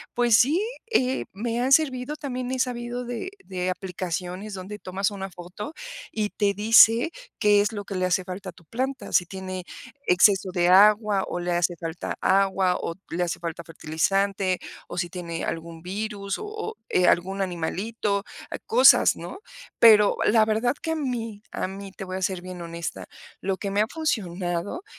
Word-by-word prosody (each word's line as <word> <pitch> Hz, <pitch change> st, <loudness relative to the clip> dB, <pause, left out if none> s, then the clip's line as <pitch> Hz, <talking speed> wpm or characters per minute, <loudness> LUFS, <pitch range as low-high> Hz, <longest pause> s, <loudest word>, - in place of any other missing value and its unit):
pues 240 Hz, -2 st, +5 dB
sí, 290 Hz, +9 st, +4 dB, 0.3 s
eh, 260 Hz, -, +1 dB
me 230 Hz, +4 st, -2 dB
han 260 Hz, +2 st, 0 dB
servido, 275 Hz, -1 st, +3 dB
también 255 Hz, -4 st, -4 dB
he 260 Hz, -, -1 dB
sabido 245 Hz, -1 st, -2 dB
de 245 Hz, +9 st, -4 dB, 0.2 s
de 185 Hz, -1 st, -3 dB
aplicaciones 185 Hz, +2 st, -4 dB
donde 195 Hz, +3 st, -7 dB
tomas 195 Hz, +2 st, -2 dB
una 195 Hz, -1 st, -5 dB
foto, 185 Hz, -, -8 dB, 0.4 s
y 210 Hz, -2 st, -2 dB
te 200 Hz, -1 st, 0 dB
dice 225 Hz, -, +6 dB, 0.3 s
qué 205 Hz, -2 st, +5 dB
es 205 Hz, -, 0 dB
lo 205 Hz, -1 st, -5 dB
que 200 Hz, -, -6 dB
le 185 Hz, -1 st, 0 dB
hace 185 Hz, +1 st, +1 dB
falta 185 Hz, +1 st, -7 dB
a -, -, -7 dB
tu 170 Hz, -, -20 dB
planta, 260 Hz, -, -4 dB
si 175 Hz, -, +4 dB
tiene 185 Hz, -1 st, -6 dB, 0.4 s
exceso 190 Hz, +1 st, +5 dB
de 175 Hz, -1 st, +2 dB
agua, 205 Hz, +1 st, +5 dB
o 175 Hz, -, -3 dB
le 175 Hz, 0 st, -2 dB
hace 175 Hz, 0 st, +1 dB
falta 165 Hz, 0 st, -4 dB
agua, 190 Hz, -1 st, +3 dB
o 165 Hz, -, -4 dB, 0.2 s
le 170 Hz, -, -2 dB
hace 175 Hz, -2 st, -1 dB
falta 170 Hz, 0 st, -5 dB
fertilizante, 185 Hz, +4 st, 0 dB, 0.3 s
o 175 Hz, -, -7 dB
si 175 Hz, -1 st, -1 dB
tiene 170 Hz, -2 st, -5 dB
algún 165 Hz, 0 st, -4 dB
virus, 200 Hz, +1 st, -4 dB
o 430 Hz, -, -6 dB
o 430 Hz, +1 st, -6 dB, 0.3 s
algún 190 Hz, +3 st, +1 dB
animalito, 195 Hz, +4 st, -2 dB, 0.4 s
cosas, 465 Hz, +3 st, +6 dB
¿no? -, -, -8 dB, 0.4 s
Pero 210 Hz, -3 st, +7 dB
la 220 Hz, 0 st, +5 dB
verdad 220 Hz, +3 st, +1 dB
que 325 Hz, -, -2 dB
a -, -, 0 dB
mí, 235 Hz, -8 st, -3 dB
a -, -, -2 dB
mí, 195 Hz, +1 st, -8 dB
te 195 Hz, -, -8 dB
voy 185 Hz, 0 st, -5 dB
a 190 Hz, -, -4 dB
ser 185 Hz, -1 st, -1 dB
bien 180 Hz, -1 st, -8 dB
honesta, 170 Hz, 0 st, -6 dB, 0.3 s
lo 190 Hz, 0 st, -1 dB
que 200 Hz, 0 st, -4 dB
me 200 Hz, +1 st, +2 dB
ha 215 Hz, -, +2 dB
funcionado, 190 Hz, -, -2 dB
195 Hz, 180 wpm, -25 LUFS, 180-230 Hz, 0.4 s, Pero